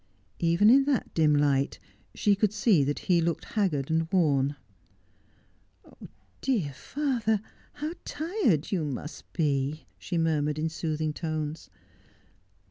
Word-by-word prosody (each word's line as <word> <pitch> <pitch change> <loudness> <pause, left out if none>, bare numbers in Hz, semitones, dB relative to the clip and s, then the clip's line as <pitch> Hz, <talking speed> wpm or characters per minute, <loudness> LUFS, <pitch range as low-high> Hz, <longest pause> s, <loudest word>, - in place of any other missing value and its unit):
Even 170 +6 +4
in 270 +2 +6
that 275 -5 0
dim 155 -2 +3
light 140 -1 +2 0.4
she 205 - +3
could 205 0 +1
see 210 - +3
that 145 +1 -1
he 175 -2 +3
looked 165 -1 -1
haggard 160 - -1
and 160 0 0
worn. 145 -6 +2 1.9
'Dear 205 - 0
father, 240 - -1 0.3
how 300 +2 -4
tired 315 - 0
you 180 -5 0
must 150 +1 -6
be 145 -1 0
!' - - -39
she 175 - -3
murmured, 150 -2 +1
in 160 +1 -1
soothing 155 -1 -2
tones. 155 -1 -4
165 Hz, 125 wpm, -28 LUFS, 150-210 Hz, 1.9 s, in